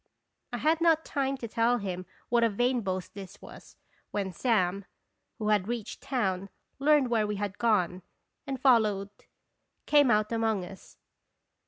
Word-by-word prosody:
" - - -53
I - - -1
had 320 +2 +1
not 325 -1 +3
time 275 -1 -1
to 235 - -6
tell 230 +2 +2
him 185 -4 -5 0.2
what 235 0 +3
a 230 - +4
vain 245 +4 +1
boast 185 -3 -4
this 195 -2 -10
was, - - -13 0.3
when 195 -2 -3
Sam, 195 -3 0 0.5
who 215 -2 -2
had 205 -2 +2
reached 235 -2 -5
town, 195 -7 -1 0.3
learned 285 -3 +3
where 220 -2 +2
we 210 - -2
had 205 -1 -4
gone, 185 -6 +1 0.5
and 270 -1 -3
followed, 215 -6 +3 0.7
came 290 -3 +5
out 210 -1 +2
among 225 -4 0
us. 190 +2 -13
220 Hz, 160 wpm, -29 LUFS, 195-250 Hz, 0.7 s, came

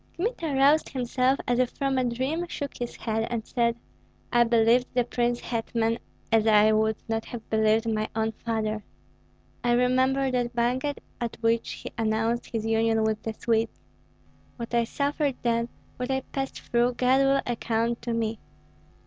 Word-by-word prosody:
Kmita 345 -4 -2
roused 285 +4 +4
himself 255 +1 +1
as 245 0 +2
if 255 -1 +3
from 270 -1 -1
a - - +2
dream, 260 +8 -1
shook 285 -4 -5
his 240 -1 -5
head, 225 0 -2
and 235 -2 -3
said, 235 -1 +1 0.6
"I 240 0 +6
believed 235 +2 +4
the 245 - +4
prince 240 0 0
hetman 230 0 -1 0.3
as 225 -1 +4
I 215 0 +6
would 220 0 +2
not 225 0 -1
have 235 -2 -8
believed 220 +1 +3
my 215 -1 0
own 220 0 +1
father. 215 -1 -2 0.8
I 240 0 +3
remember 260 +2 +2
that 245 -1 -1
banquet 255 +4 0 0.2
at 235 -1 -3
which 230 0 +1
he - - -8
announced 225 +1 0
his 225 -2 -3
union 225 0 +2
with 220 -1 0
the 225 - -4
Swedes. 225 0 0 0.8
What 235 -1 -7
I 235 -1 +3
suffered 285 +2 -1
then, 235 0 +1 0.3
what 250 +1 -3
I 265 0 +1
passed 270 +1 -5
through, 240 +1 +1
God 255 +2 +3
will 275 0 +3
account 235 0 -1
to 235 - -2
me. 225 -1 -1
235 Hz, 165 wpm, -27 LUFS, 225-255 Hz, 0.8 s, I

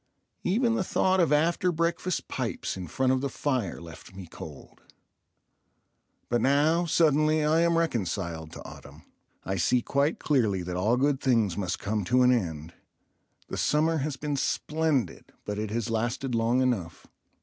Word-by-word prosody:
Even 230 +5 +2
the 210 - 0
thought 190 +1 +1
of 165 -5 +3
after 170 +4 +2
breakfast 170 +2 -1
pipes - - -3
in 90 -2 -6
front 130 - +1
of 130 - 0
the 140 - -1
fire 125 - -2
left 85 +3 -12
me 95 -1 -8
cold. 80 -3 -11 1.5
But 120 - 0
now, 155 +6 +3
suddenly, 155 -1 +3
I 155 +2 +3
am 170 0 +3
reconciled 90 - -2
to - - -10
autumn. - - -12 0.4
I 95 0 -2
see 120 +8 +2
quite 140 +3 +1
clearly 110 -11 +1
that 90 0 -4
all 105 +7 +2
good 140 +1 +1
things 115 -9 +2
must 90 -4 -2
come 105 +1 -2
to 125 +5 +3
an 125 - +5
end. 85 -8 -2 0.8
The - - -4
summer 160 +2 +2
has 145 -1 -3
been 145 0 -3
splendid, 150 -2 -1
but 105 0 -3
it 110 0 -3
has 115 +1 -2
lasted 120 +3 -2
long 115 +2 +2
enough. 95 -11 -2
130 Hz, 160 wpm, -27 LUFS, 100-155 Hz, 1.5 s, an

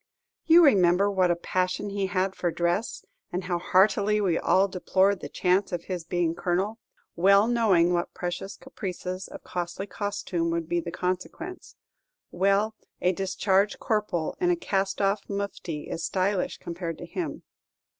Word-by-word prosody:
You 335 +1 +8
remember 195 -4 +4
what 185 -2 +2
a 175 - +3
passion 185 +3 -2
he 200 -1 -1
had 190 +1 0
for 175 - -1
dress, 175 +6 -1 0.3
and 180 +1 -2
how 180 -1 -1
heartily 205 +3 +3
we 185 -5 +1
all 195 +1 +3
deplored 190 +1 +1
the - - -7
chance 185 +2 +1
of 175 -2 -3
his 180 -3 -5
being 175 -1 0
colonel, 185 +6 -1 0.4
well 200 +4 +5
knowing 200 -8 +3
what 175 0 -2
precious 180 +2 -4
caprices 185 -1 -6
of - - -11
costly 175 +2 -4
costume 200 -4 -2
would 165 -1 -2
be 175 +1 0
the 170 0 -5
consequence; 185 - -4 0.6
well, 200 +4 +2 0.3
a 180 - +2
discharged 195 +1 +1
corporal 210 -7 -1
in 355 - +3
a 355 - +4
cast 195 - -1
off 200 +1 0
mufti 200 -6 -4
is 165 - -5
stylish 190 0 0
compared 170 -1 -5
to - - -8
him. 335 - -5
190 Hz, 155 wpm, -27 LUFS, 175-200 Hz, 0.6 s, You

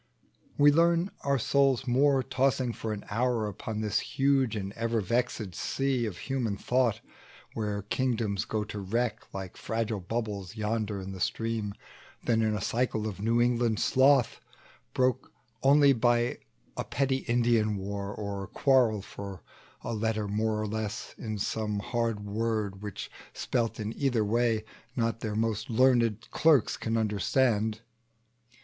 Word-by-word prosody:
We 145 0 +7
learn 170 +4 +3
our 140 0 +2
souls 135 +1 +2
more, 135 +2 +3
tossing 130 -1 +1
for 110 - -4
an 105 -1 -5
hour 120 0 +1
Upon 105 +2 -5
this 105 0 +1
huge 135 -4 +1
and 100 -1 -4
ever 115 0 -1
vexèd 110 -1 -1
sea 135 +3 -1
Of 95 -5 -6
human 120 -3 -2
thought, 125 +1 +1 0.5
where 105 -2 -2
kingdoms 110 -3 -1
go 110 -1 -1
to 105 0 -6
wreck 115 +5 -2
Like 95 -2 -7
fragile 110 -2 -2
bubbles 100 -1 -4
yonder 110 -1 -2
in 95 0 -6
the 95 - -7
stream, 110 -1 -2 0.5
Than 115 -2 +2
in 110 -1 +1
a 105 - -3
cycle 115 -3 0
of 100 -3 -6
New 115 +2 +2
England 120 -2 +2
sloth, 130 -2 +4 0.6
Broke 130 0 +1 0.3
only 140 0 +6
by 120 0 +2 0.4
some - - -3
petty 135 0 +1
Indian 115 -4 +1
war, 100 +1 -4
Or 100 -2 -5
quarrel 120 -6 +3
for 100 -5 -8 0.4
a - - -3
letter 110 -1 -1
more 105 +1 0
or 110 - -1
less, 110 +1 -4
In 110 -2 -4
some 105 +1 -2
hard 115 0 -1
word, 105 -2 -2
which, 105 -3 -6 0.2
spelt 115 -3 -1
in 110 +1 -4
either 125 -6 +1
way 115 0 +1 0.3
Not 115 -1 0
their 110 -2 -3
most 110 -1 -1
learned 120 -2 +3
clerks 155 -6 +4
can 115 0 -2
understand. 110 +1 +1
115 Hz, 145 wpm, -29 LUFS, 105-125 Hz, 0.6 s, We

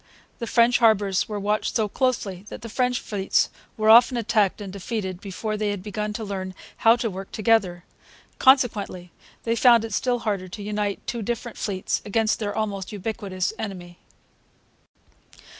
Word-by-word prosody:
The 235 - -4
French 235 +1 +4
harbours 205 -5 +3
were 210 -1 -3
watched 210 +1 -1
so 220 -2 +2
closely 205 -6 -1
that - - -9
the 230 - -6
French 250 +1 0
fleets 195 -2 0 0.3
were 215 0 0
often 240 +2 +7
attacked 220 -4 +1
and 195 -2 -7
defeated 195 -2 -4
before 215 +2 -4
they 210 0 -1
had 200 -2 -4
begun 210 0 -3
to 220 - -4
learn 190 -2 -5 0.2
how 225 +1 +5
to 240 -2 -2
work 190 +1 -8
together. 205 -6 +1 0.6
Consequently, 215 -9 +3 0.3
they 230 0 0
found 235 -2 +5
it 225 - -7
still 245 +4 +1
harder 200 -5 -2
to 200 +3 -8
unite 205 -1 -2
two 235 - -3
different 235 +1 -4
fleets 190 -3 -2
against 220 +1 0
their 205 -2 -3
almost 200 -3 -3
ubiquitous 200 -2 -3
enemy. 180 -5 -7
210 Hz, 160 wpm, -24 LUFS, 195-230 Hz, 0.6 s, often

